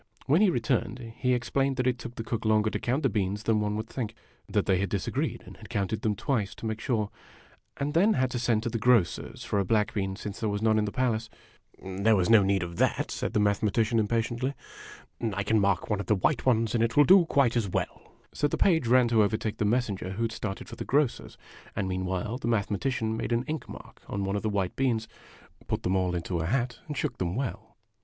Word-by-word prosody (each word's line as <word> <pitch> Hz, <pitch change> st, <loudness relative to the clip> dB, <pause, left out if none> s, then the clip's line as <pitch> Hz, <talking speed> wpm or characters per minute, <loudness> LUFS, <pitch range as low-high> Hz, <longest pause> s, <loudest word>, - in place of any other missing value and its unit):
When 155 Hz, +8 st, +4 dB
he 210 Hz, -, +6 dB
returned, 120 Hz, -, -1 dB
he 125 Hz, -1 st, +2 dB
explained 135 Hz, +2 st, 0 dB
that 125 Hz, -, 0 dB
it 125 Hz, -1 st, +1 dB
took 120 Hz, 0 st, -8 dB
the 115 Hz, -, -4 dB
cook 115 Hz, 0 st, -3 dB
longer 110 Hz, -1 st, +2 dB
to -, -, -2 dB
count 130 Hz, +6 st, -1 dB
the -, -, +5 dB
beans 100 Hz, -1 st, -1 dB
than 110 Hz, -1 st, +2 dB
one 105 Hz, 0 st, -1 dB
would 110 Hz, +1 st, -3 dB
think. 115 Hz, -2 st, -4 dB, 0.3 s
That -, -, +1 dB
they 95 Hz, -2 st, +2 dB
had 100 Hz, -, -1 dB
disagreed, 100 Hz, -3 st, -2 dB
and -, -, -12 dB
had -, -, -13 dB
counted 100 Hz, +2 st, -2 dB
them 110 Hz, -2 st, 0 dB
twice, 105 Hz, -2 st, -1 dB
to -, -, -8 dB
make 110 Hz, 0 st, -2 dB
sure; 110 Hz, -5 st, -1 dB, 0.7 s
and 145 Hz, +1 st, -2 dB
then 195 Hz, +7 st, +4 dB
had 130 Hz, -6 st, +1 dB
to 120 Hz, -, -2 dB
send 115 Hz, -2 st, +1 dB
to 120 Hz, -, -1 dB
the 115 Hz, -, -2 dB
grocer's 115 Hz, -5 st, +1 dB
for 105 Hz, -, 0 dB
a -, -, +2 dB
black 105 Hz, +2 st, +1 dB
bean, 95 Hz, -2 st, -2 dB
since 105 Hz, 0 st, -7 dB
there 110 Hz, -, -1 dB
was 105 Hz, +1 st, -2 dB
none 110 Hz, -1 st, +4 dB
in 105 Hz, -, +1 dB
the 105 Hz, -, -3 dB
palace. 115 Hz, -2 st, 0 dB, 0.5 s
"There 100 Hz, +4 st, +2 dB
was 95 Hz, +2 st, +2 dB
no 110 Hz, -2 st, +8 dB
need 95 Hz, -1 st, +1 dB
of 85 Hz, -1 st, -7 dB
that," -, -, +1 dB
said -, -, -3 dB
the -, -, +2 dB
Mathematician, 110 Hz, +2 st, +2 dB
impatiently. 120 Hz, +5 st, -1 dB, 0.4 s
" -, -, -23 dB
I 100 Hz, -, -1 dB
can 110 Hz, +2 st, +2 dB
mark 100 Hz, -3 st, +1 dB
one 105 Hz, -2 st, 0 dB
of 100 Hz, -, -5 dB
the 105 Hz, -, +3 dB
white 130 Hz, +8 st, 0 dB
ones, 115 Hz, -3 st, +3 dB
and 115 Hz, -1 st, +2 dB
it 115 Hz, +3 st, -1 dB
will 145 Hz, -, +9 dB
do 185 Hz, +2 st, +7 dB
quite 135 Hz, -7 st, +2 dB
as 110 Hz, -5 st, 0 dB
well." -, -, -4 dB, 0.2 s
So 145 Hz, -, +1 dB
the -, -, -2 dB
page 165 Hz, -9 st, +3 dB
ran 125 Hz, 0 st, +5 dB
to 115 Hz, -2 st, +4 dB
overtake 110 Hz, +1 st, 0 dB
the 105 Hz, -, 0 dB
messenger 105 Hz, -4 st, 0 dB
who 115 Hz, +4 st, -2 dB
had 115 Hz, -, 0 dB
started 100 Hz, -3 st, -5 dB
for -, -, -9 dB
the -, -, -4 dB
grocer's 140 Hz, -2 st, 0 dB, 0.4 s
and 100 Hz, -, -1 dB
meanwhile 95 Hz, +5 st, -2 dB
the 115 Hz, -, -4 dB
Mathematician 110 Hz, +1 st, 0 dB
made 110 Hz, -, -3 dB
an 120 Hz, +1 st, +1 dB
ink 155 Hz, +1 st, -5 dB
mark -, -, -11 dB
on 100 Hz, -, -3 dB
one 95 Hz, +1 st, -1 dB
of 100 Hz, -, -1 dB
the 110 Hz, -, -1 dB
white 100 Hz, -3 st, -1 dB
beans, 120 Hz, -5 st, 0 dB, 0.6 s
put -, -, -2 dB
them 95 Hz, -, +1 dB
all 90 Hz, -1 st, +1 dB
into 85 Hz, 0 st, -2 dB
a 80 Hz, -, -1 dB
hat, 125 Hz, +2 st, -1 dB
and 150 Hz, -3 st, -5 dB
shook -, -, -2 dB
them 90 Hz, 0 st, -1 dB
well. 115 Hz, -4 st, -5 dB
110 Hz, 245 wpm, -28 LUFS, 100-125 Hz, 0.7 s, will